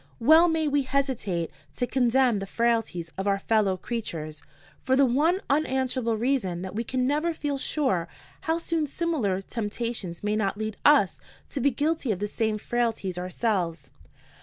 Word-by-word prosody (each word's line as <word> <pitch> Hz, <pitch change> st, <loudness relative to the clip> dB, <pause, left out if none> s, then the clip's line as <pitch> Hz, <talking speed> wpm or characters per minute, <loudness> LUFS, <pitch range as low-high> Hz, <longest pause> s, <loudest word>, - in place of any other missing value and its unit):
Well 315 Hz, +8 st, +7 dB
may 320 Hz, -2 st, +1 dB
we 290 Hz, 0 st, +2 dB
hesitate 260 Hz, -11 st, -1 dB, 0.2 s
to 245 Hz, -, 0 dB
condemn 245 Hz, -2 st, +2 dB
the 195 Hz, -, -5 dB
frailties 225 Hz, -8 st, 0 dB
of 195 Hz, -, -2 dB
our 200 Hz, 0 st, +3 dB
fellow 200 Hz, -2 st, +1 dB
creatures, 160 Hz, -9 st, -5 dB, 0.4 s
for 260 Hz, -, +2 dB
the 275 Hz, +1 st, +5 dB
one 310 Hz, +10 st, +2 dB
unanswerable 260 Hz, -5 st, 0 dB
reason 215 Hz, -8 st, 0 dB
that 185 Hz, -, -6 dB
we 225 Hz, +3 st, -2 dB
can 255 Hz, +1 st, -1 dB
never 305 Hz, +5 st, 0 dB
feel 285 Hz, -3 st, -2 dB
sure 260 Hz, -, 0 dB, 0.3 s
how 320 Hz, 0 st, 0 dB
soon 330 Hz, -2 st, -1 dB
similar 265 Hz, -, -1 dB
temptations 215 Hz, -5 st, -4 dB
may 210 Hz, 0 st, +1 dB
not 205 Hz, -1 st, 0 dB
lead 215 Hz, -1 st, -3 dB
us 285 Hz, -10 st, +5 dB, 0.3 s
to 280 Hz, -, -4 dB
be 280 Hz, -, +4 dB
guilty 290 Hz, 0 st, 0 dB
of 200 Hz, -, -1 dB
the 205 Hz, -, -2 dB
same 220 Hz, +1 st, -1 dB
frailties 220 Hz, -5 st, -1 dB
ourselves. 180 Hz, -, -2 dB
235 Hz, 160 wpm, -26 LUFS, 195-275 Hz, 0.4 s, Well